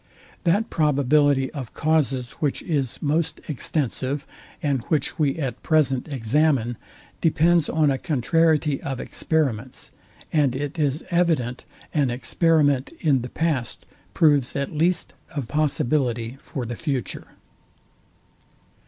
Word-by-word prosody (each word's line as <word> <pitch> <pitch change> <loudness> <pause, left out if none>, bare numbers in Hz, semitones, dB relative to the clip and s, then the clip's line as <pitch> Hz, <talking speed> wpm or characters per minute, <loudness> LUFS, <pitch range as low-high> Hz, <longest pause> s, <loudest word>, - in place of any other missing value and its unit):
That 200 +6 +2
probability 145 -2 +3
of 130 -6 -7
causes, 140 -5 +1
which 145 -3 -1
is 140 -8 -1
most 155 +2 0
extensive, 140 -1 -2 0.4
and 140 -4 +1
which 155 +1 -1
we 145 -3 +2
at 135 -7 -3
present 145 -5 +2
examine, 135 -1 +1 0.5
depends 165 0 +3
on 155 -3 +3
a 135 - -1
contrariety 155 +1 +2
of 135 -3 -4
experiments: 130 -6 -1 0.4
and 145 -5 +3
it 145 +4 -4
is 145 +1 0
evident 160 -9 +1 0.3
an 145 -4 +2
experiment 145 +1 +2
in 140 -5 +2
the 125 - -6
past 150 -7 -2 0.3
proves 145 -5 +3
at 140 +2 -2
least 170 +4 +1 0.2
a 140 - -1
possibility 130 -3 0
for 130 -3 -5
the 120 +1 -4
future. 135 -3 -4
145 Hz, 120 wpm, -24 LUFS, 130-155 Hz, 0.5 s, probability